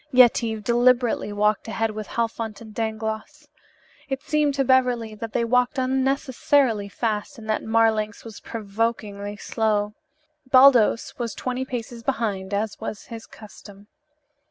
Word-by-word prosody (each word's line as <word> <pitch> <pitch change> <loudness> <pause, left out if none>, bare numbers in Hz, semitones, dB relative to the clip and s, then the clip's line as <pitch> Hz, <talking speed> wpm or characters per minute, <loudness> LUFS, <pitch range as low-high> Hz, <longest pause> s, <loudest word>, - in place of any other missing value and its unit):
Yetive 230 -3 +4
deliberately 240 -1 +2
walked 210 +1 +1
ahead 225 0 -1
with 215 -1 -6
Halfont 225 -2 -3
and 220 -2 -12
Dangloss. 220 +7 -4 0.6
It 270 +1 -3
seemed 300 -2 +1
to 275 - +2
Beverly 250 -4 +2
that 220 0 -7
they 235 - +1
walked 250 +2 +2
unnecessarily 260 -3 +1
fast 220 +5 -3
and 220 -1 -11
that 215 - 0
Marlanx 220 -2 +1
was 225 -3 -9
provokingly 210 -1 -3
slow. 210 0 -1 0.6
Baldos 255 -4 +5
was 235 -2 -3
twenty 255 +1 -3
paces 240 -2 -6
behind, 215 -6 -2
as 210 +1 -2
was 220 -2 -6
his 225 -1 -8
custom. 205 -1 -14
225 Hz, 130 wpm, -24 LUFS, 215-250 Hz, 0.6 s, Baldos